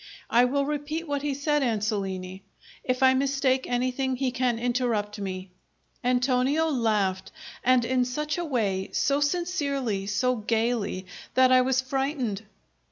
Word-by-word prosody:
I 240 +2 +5
will 280 +2 0
repeat 300 +3 -3
what 285 -1 -1
he 290 -1 -1
said, 295 +1 +1
Ansolini. 200 -5 -2 0.4
If 255 +1 0
I 260 0 +7
mistake 265 -1 +1
anything, 255 +2 0
he 255 0 -1
can 245 -2 0
interrupt 230 -4 -1
me." 185 -1 -5 0.5
Antonio 255 +5 +2
laughed, 210 -8 0 0.3
and 250 -1 +4
in 255 +1 +2
such 300 +6 -2
a - - -1
way, 205 - -1
so 280 0 +2
sincerely, 280 - -1
so 250 +5 +1
gaily, 220 -3 -1 0.3
that 255 0 +5
I 255 0 +7
was 260 0 +2
frightened. 260 -5 -2
255 Hz, 140 wpm, -26 LUFS, 220-275 Hz, 0.5 s, I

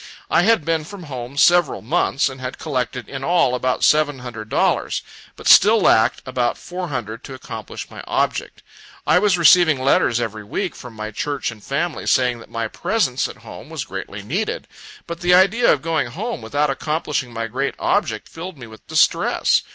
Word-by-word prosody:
I - - +5
had 215 -4 +3
been 165 -1 0
from 185 +3 -10
home 130 -2 -7
several 175 -4 +4
months, 140 +1 +1
and 130 0 -7
had 125 0 -5
collected 125 -4 -3
in 135 -1 -6
all 170 -5 +2
about 125 0 -1
seven 150 -2 +3
hundred 115 -4 -8
dollars, - - 0 0.3
but - - -7
still 220 +2 +7
lacked 110 - +3
about 125 -2 -1
four 180 0 -6
hundred 115 -6 -5
to 135 - -8
accomplish 130 - -8
my - - -9
object. - - -2 0.4
I 180 - +4
was 200 -3 +3
receiving 170 -4 +6
letters 130 -3 +2
every 110 -2 -4
week 175 - -3
from 125 -3 -11
my 110 0 -5
Church 140 +3 -3
and 110 -3 -13
family, 155 +4 -2
saying 125 -2 +2
that - - -14
my 115 -1 -3
presence 135 - -1
at - - -11
home - - -10
was - - -5
greatly 100 0 -7
needed; 180 - -3 0.4
but 170 -1 -6
the 175 +1 +4
idea 195 +6 +4
of 135 - 0
going 165 -5 0
home 210 - -5
without 145 +6 0
accomplishing 150 -3 -2
my 115 -1 -3
great 130 +5 -2
object, - - 0
filled 170 0 -8
me 125 - -9
with 110 -1 -15
distress. - - +2
135 Hz, 185 wpm, -21 LUFS, 120-175 Hz, 0.4 s, still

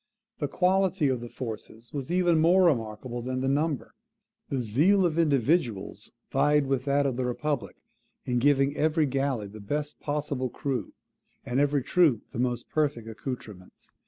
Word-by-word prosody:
The 145 - -1
quality 185 -1 +2
of 125 -2 -1
the 120 - -7
forces 115 -1 -8
was 140 -3 -4
even 175 -2 +3
more 180 +3 +5
remarkable 120 -4 -1
than 130 +1 -3
the 135 - 0
number. 145 +1 0 0.6
The 130 -3 -1
zeal 170 - +3
of 170 -1 0
individuals 130 - 0 0.2
vied 145 +1 +3
with 135 -1 -1
that 140 0 +2
of 130 -3 -1
the 130 - -1
republic 145 +2 -2 0.5
in 125 -1 0
giving 140 +1 +3
every 155 0 +2
galley 135 -4 -1
the 105 +2 -10
best 145 +8 -4
possible 145 -3 -2
crew, 135 +1 -3 0.5
and 130 0 0
every 145 -1 +2
troop 155 -10 +3
the - - -6
most 125 -1 -1
perfect 145 -7 -1
accoutrements. 110 -4 -8
135 Hz, 160 wpm, -27 LUFS, 120-150 Hz, 0.6 s, more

